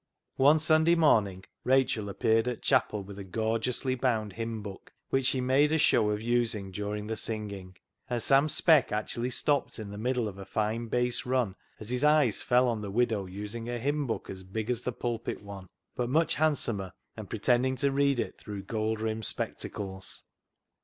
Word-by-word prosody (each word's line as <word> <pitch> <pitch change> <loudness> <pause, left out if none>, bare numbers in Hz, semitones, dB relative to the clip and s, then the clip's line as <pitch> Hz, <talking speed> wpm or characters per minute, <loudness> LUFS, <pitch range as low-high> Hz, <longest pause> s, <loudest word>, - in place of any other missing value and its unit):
One 145 +4 +6
Sunday 155 +2 +4
morning 105 - +3 0.2
Rachel 125 -5 +2
appeared 110 +3 +2
at 125 -2 -3
chapel 110 -6 +2
with 100 +1 -10
a - - -5
gorgeously 115 +6 -1
bound 115 -5 0
hymn 115 -1 -4
book, 100 -2 -9 0.2
which 135 -1 +2
she 130 -1 +1
made 135 +4 +3
a 160 - +3
show 110 -7 +3
of 105 +1 -2
using 115 -5 0
during 105 +2 -4
the 110 +1 -3
singing, 100 -4 -5 0.3
and 120 -1 0
Sam 140 +5 +4
Speck 155 -1 +4
actually 115 +3 -1
stopped 140 +2 0
in 105 -3 -7
the 100 - -7
middle 125 0 0
of 100 -1 -8
a - - -6
fine 110 +2 -1
bass 125 +1 0
run 125 -6 0 0.3
as 110 +2 -5
his 125 +2 -1
eyes 150 -7 +4
fell 125 +1 +3
on 115 -3 -1
the 100 - -5
widow 110 -2 0
using 105 +5 -6
a 120 - -2
hymn 145 +3 -1
book 115 - -3
as 95 -1 -7
big 110 +5 -3
as 120 -1 -2
the 125 - -2
pulpit 120 -3 -4
one, 100 -2 -9 0.3
but 120 -1 -1
much 160 +5 +2
handsomer, 115 -11 0 0.2
and - - -8
pretend 125 +1 +2
ing 130 - -1
to 140 +2 +1
read 140 -1 +2
it - - -3
through 100 -2 -7
gold 110 +1 -2
rimmed 110 0 -2
spectacles. 95 -2 -3
115 Hz, 190 wpm, -29 LUFS, 105-130 Hz, 0.3 s, One